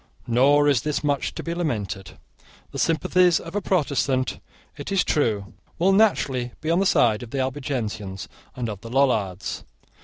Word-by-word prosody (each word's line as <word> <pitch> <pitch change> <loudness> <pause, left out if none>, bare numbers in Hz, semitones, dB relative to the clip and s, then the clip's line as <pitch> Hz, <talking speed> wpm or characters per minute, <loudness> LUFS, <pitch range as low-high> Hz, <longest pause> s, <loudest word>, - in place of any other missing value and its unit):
Nor 140 +5 +4
is 140 -5 +3
this 150 +2 -2
much 145 -2 -1
to - - -5
be 170 - -3
lamented. 110 - -3 0.5
The - - -6
sympathies 175 +2 +3
of 165 +3 -9
a 205 - 0
Protestant, 140 -8 0 0.4
it - - -7
is 195 -3 +3
true, 105 -9 0 0.2
will 185 +3 +3
naturally 135 - +2
be 160 - -2
on 170 - +3
the 195 - +2
side 110 -9 +3
of 120 - -8
the 135 - -5
Albigensians 125 -8 -3 0.3
and 125 -2 -3
of 105 -3 -6
the 115 - -9
Lollards. 110 -8 0
135 Hz, 165 wpm, -24 LUFS, 115-165 Hz, 0.5 s, Nor